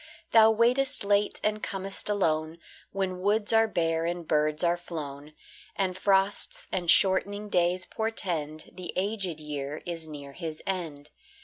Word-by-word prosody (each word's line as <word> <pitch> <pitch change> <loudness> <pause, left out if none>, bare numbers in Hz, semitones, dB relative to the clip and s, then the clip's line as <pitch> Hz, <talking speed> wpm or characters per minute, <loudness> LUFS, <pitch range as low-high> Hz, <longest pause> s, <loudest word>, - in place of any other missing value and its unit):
Thou 220 -1 +7
waitest 240 +4 +2
late 205 +1 +1
and 215 0 0
com'st 195 +1 -2
alone, 160 -5 0 0.3
When 190 -2 -2
woods 210 +3 +2
are 225 0 +5
bare 165 -4 0
and 175 -1 -4
birds 150 +1 +2
are 170 0 +3
flown, 150 -4 -8 0.4
And 185 -2 -1
frosts 195 +1 +1
and 175 -3 -2
shortening 200 +3 +3
days 180 0 +2
portend 170 -9 -3
The 180 -1 -7
aged 190 -4 -2
year 150 -1 -5
is 165 -2 -5
near 145 -2 -9
his 160 +1 -6
end. 160 -6 -4
180 Hz, 140 wpm, -28 LUFS, 155-205 Hz, 0.4 s, Thou